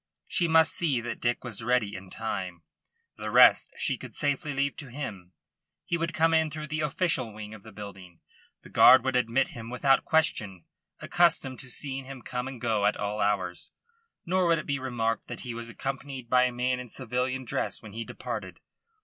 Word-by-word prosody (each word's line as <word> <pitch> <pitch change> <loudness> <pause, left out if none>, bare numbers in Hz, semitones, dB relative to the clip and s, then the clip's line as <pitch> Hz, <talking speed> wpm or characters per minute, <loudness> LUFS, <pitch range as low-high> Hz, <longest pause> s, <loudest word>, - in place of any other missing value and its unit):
She 175 - +1
must 160 0 +5
see 150 -8 +1
that 120 0 -5
Dick 120 0 0
was 115 -3 -4
ready 120 -4 +1
in 95 0 -9
time. 95 -6 -4 0.5
The - - -4
rest - - +6
she - - 0
could - - -10
safely 145 +1 0
leave 140 0 0
to 145 - -8
him. 105 -10 -7 0.5
He - - 0
would 165 0 -1
come 165 0 +2
in 160 -1 +3
through 150 0 -6
the 155 +1 -2
official 150 -5 0
wing 105 0 -8
of 110 - -11
the 110 - -13
building. 95 -4 -10 0.4
The - - -13
guard 130 -1 +8
would 130 -1 0
admit 125 +2 +2
him 115 -1 -8
without 135 +2 +3
question, 105 - +1 0.4
accustomed 165 -7 +2
to 130 - -5
seeing 135 +1 -5
him 135 -2 -9
come 125 0 -3
and 135 -2 -7
go 110 -4 +1
at 105 - 0
all 105 +1 -2
hours, 100 -4 -1 0.5
nor 185 +1 +2
would 165 -1 +4
it 155 - -5
be 140 -1 -1
remarked 115 -3 -2
that - - -6
he 125 -2 -5
was 115 0 -7
accompanied 135 -1 -5
by 125 0 +6
a 125 - 0
man 125 +1 0
in 125 - -7
civilian 130 +2 -2
dress 115 - -2
when 105 -2 -10
he 115 +1 -4
departed. - - -6
125 Hz, 200 wpm, -28 LUFS, 110-140 Hz, 0.5 s, guard